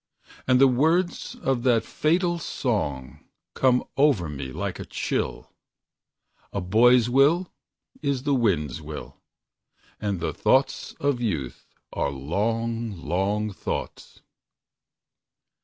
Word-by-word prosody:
And 130 -1 +4
the 135 - +7
words 160 +8 +1
of 130 -3 -1
that 120 -3 +3
fatal 175 +2 +1
song 75 - -3 0.3
Come 125 -1 +3
over 135 - +3
me 70 -3 -6
like - - -4
a - - -6
chill: - - -3 1.0
"A - - -2
boy's 115 +6 +4
will 145 +8 +3 0.5
is 140 -4 -1
the 145 -1 +1
wind's 90 - 0
will, - - -9 0.8
And 100 -4 -2
the 85 - -2
thoughts 135 +1 +1
of 140 -3 -1
youth 80 - -3 0.3
are 70 - 0
long, 110 - -2
long 100 +5 -1
thoughts." - - -6
115 Hz, 110 wpm, -25 LUFS, 95-135 Hz, 1.0 s, the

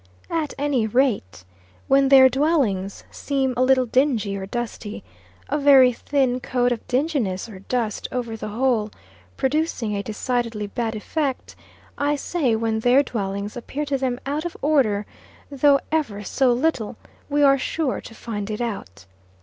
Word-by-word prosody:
At 320 -3 -2
any 275 -5 +1
rate, 220 - 0 0.4
when 275 0 +4
their 265 -1 +9
dwellings 260 - 0
seem 270 -2 -1
a 250 - 0
little 255 0 +4
dingy 235 -5 +1
or 190 -1 -5
dusty 225 -2 -5 0.4
a 295 - -1
very 270 -3 +6
thin 260 -1 0
coat 245 -1 0
of 235 - -2
dinginess 250 - -1
or 205 -4 -10
dust 220 +1 -2
over 240 -3 -3
the 220 - -6
whole, 225 -1 0 0.5
producing 265 -6 0
a 200 - -1
decidedly 225 0 -2
bad 225 +2 -3
effect 270 +5 -3 0.4
I 290 +1 +1
say 280 -5 0
when 220 0 -1
their 245 +5 +4
dwellings 200 -4 -4
appear 275 +4 -4
to 280 -1 0
them 255 -2 -1
out 290 +3 -2
of 345 - -5
order 245 -9 +2 0.5
though 280 0 +4
ever 225 -11 -1
so 255 +5 +2
little 245 -4 0 0.3
we 290 0 +2
are 275 -1 +5
sure 300 -1 -2
to 225 - -12
find 210 -3 -5
it 210 - -3
out. 200 - -5
250 Hz, 155 wpm, -23 LUFS, 220-275 Hz, 0.5 s, their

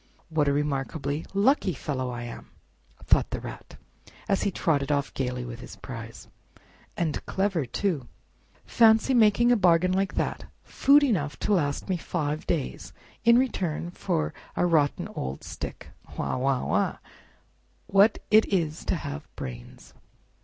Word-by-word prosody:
"What 155 -2 +1
a - - +4
remarkably 145 +1 -2
lucky 200 -1 +2
fellow 130 -2 -3
I 120 -1 -5
am!" 120 - -9 0.6
thought - - +3
the - - -3
Rat, - - -9 0.5
as 195 - +1
he 205 - +1
trotted 150 -6 0
off 140 -1 0
gayly 125 -1 -3
with 120 0 -7
his 125 - -10
prize, 115 -3 -9 0.7
"and 165 -3 -1
clever, 190 -8 0
too! 150 - -1 0.6
Fancy 225 +3 +4
making 235 0 +5
a - - +6
bargain 180 -3 +4
like 195 +1 0
that—food 285 +2 +2
enough 150 - 0
to 210 - +1
last 145 -7 0
me 185 -2 0
five 155 -3 -3
days 155 -6 -3 0.3
in 235 0 +7
return 180 -10 -1
for 175 -3 -2 0.2
a - - +2
rotten 155 -5 +2
old 65 +1 -5
stick! - - -7 0.3
Wah! - - -1
Wah! 130 0 0
Wah! - - 0 0.9
What 200 +3 +4
it 215 +1 +6
is 165 -5 -1
to - - +1
have 70 - -6
brains!" - - -9
160 Hz, 145 wpm, -27 LUFS, 135-195 Hz, 0.9 s, in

